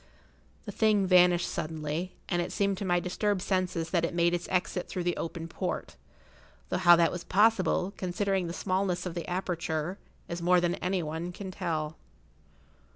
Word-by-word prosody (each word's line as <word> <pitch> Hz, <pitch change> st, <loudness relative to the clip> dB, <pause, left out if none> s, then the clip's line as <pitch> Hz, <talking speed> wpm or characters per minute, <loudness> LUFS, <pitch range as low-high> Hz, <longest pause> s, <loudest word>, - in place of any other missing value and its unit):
The 205 Hz, -, -5 dB
thing 210 Hz, -1 st, +3 dB
vanished 180 Hz, -1 st, +5 dB
suddenly, 160 Hz, +2 st, -3 dB
and 175 Hz, -2 st, 0 dB
it 175 Hz, -, -4 dB
seemed 200 Hz, -2 st, 0 dB
to 200 Hz, -, -3 dB
my 175 Hz, -1 st, +2 dB
disturbed 185 Hz, +2 st, -1 dB
senses 185 Hz, -4 st, -1 dB
that 170 Hz, -3 st, +2 dB
it 170 Hz, -, -1 dB
made 170 Hz, 0 st, +3 dB
its 175 Hz, 0 st, -2 dB
exit 180 Hz, 0 st, -1 dB
through 180 Hz, -, -3 dB
the 175 Hz, 0 st, 0 dB
open 165 Hz, 0 st, -5 dB
port, 180 Hz, +2 st, -4 dB, 0.7 s
though -, -, 0 dB
how 175 Hz, -2 st, +8 dB
that 170 Hz, -1 st, +3 dB
was 175 Hz, -1 st, -5 dB
possible, 200 Hz, -2 st, +2 dB
considering 190 Hz, 0 st, -1 dB
the -, -, -4 dB
smallness 185 Hz, +1 st, -1 dB
of 180 Hz, -, -3 dB
the 170 Hz, -1 st, -5 dB
aperture, 175 Hz, -1 st, -2 dB, 0.3 s
is 170 Hz, 0 st, -5 dB
more 180 Hz, +1 st, +4 dB
than 175 Hz, 0 st, +1 dB
any 180 Hz, -1 st, 0 dB
one 160 Hz, +3 st, -4 dB
can 190 Hz, +1 st, -7 dB
tell. 160 Hz, -5 st, -3 dB
180 Hz, 175 wpm, -29 LUFS, 170-190 Hz, 0.7 s, how